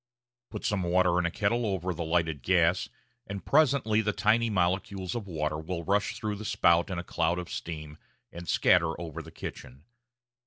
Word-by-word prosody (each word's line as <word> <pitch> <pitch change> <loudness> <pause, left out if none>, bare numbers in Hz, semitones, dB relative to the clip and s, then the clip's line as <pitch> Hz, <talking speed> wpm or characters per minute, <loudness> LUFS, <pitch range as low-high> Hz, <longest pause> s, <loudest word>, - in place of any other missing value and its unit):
Put 105 - -6
some 105 -2 +1
water 90 0 +3
in 85 - +1
a - - 0
kettle 105 +6 0
over 95 -4 -1
the 85 0 -4
lighted 80 -3 0
gas, 90 +3 +2 0.4
and 100 -1 -6
presently 135 -7 +3
the 105 -1 0
tiny 115 +2 +2
molecules 95 0 -1
of 115 -4 -4
water 75 -3 -2
will 85 +2 -4
rush 100 +4 +1
through 105 -1 -3
the 110 - -7
spout 85 -3 +3
in 95 - -3
a 85 - -3
cloud 85 0 0
of 90 -1 -6
steam 75 -2 -6 0.3
and 85 0 -9
scatter 85 -2 +3
over 85 -3 -6
the - - -11
kitchen. 65 +4 -9
90 Hz, 185 wpm, -29 LUFS, 85-105 Hz, 0.4 s, water